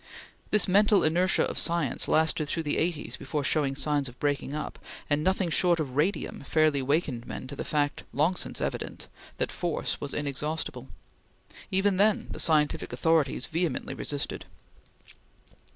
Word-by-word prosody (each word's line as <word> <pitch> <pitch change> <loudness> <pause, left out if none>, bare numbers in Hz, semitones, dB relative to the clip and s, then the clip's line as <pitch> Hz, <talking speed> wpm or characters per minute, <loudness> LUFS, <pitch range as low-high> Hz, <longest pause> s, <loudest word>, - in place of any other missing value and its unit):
This 210 - +3
mental 205 +2 +4
inertia 175 +4 +3
of - - -1
science 170 -6 -1
lasted 155 -1 +2
through 165 +3 -2
the 150 - 0
eighties 165 -2 -2
before 145 +1 -3
showing 140 -1 +1
signs 145 -2 +1
of 125 - -16
breaking 145 0 -1
up; 150 - -5 0.3
and 145 +1 +2
nothing 190 -1 +1
short 175 0 +3
of 135 -5 -3
radium 165 +8 0
fairly 155 -1 +2
wakened 135 -3 -1
men - - -6
to 135 +2 -7
the - - -4
fact, 145 -1 -1
long 155 +6 +2
since - - -4
evident, - - -4 0.3
that - - -1
force 175 -3 -2
was 140 - -3
inexhaustible. 150 +2 -2 0.8
Even 195 0 +2
then 210 +1 +3
the - - -5
scientific 150 -3 +2
authorities 145 0 +1
vehemently 165 +1 -2
resisted. 145 -1 -3
155 Hz, 150 wpm, -28 LUFS, 145-175 Hz, 0.8 s, mental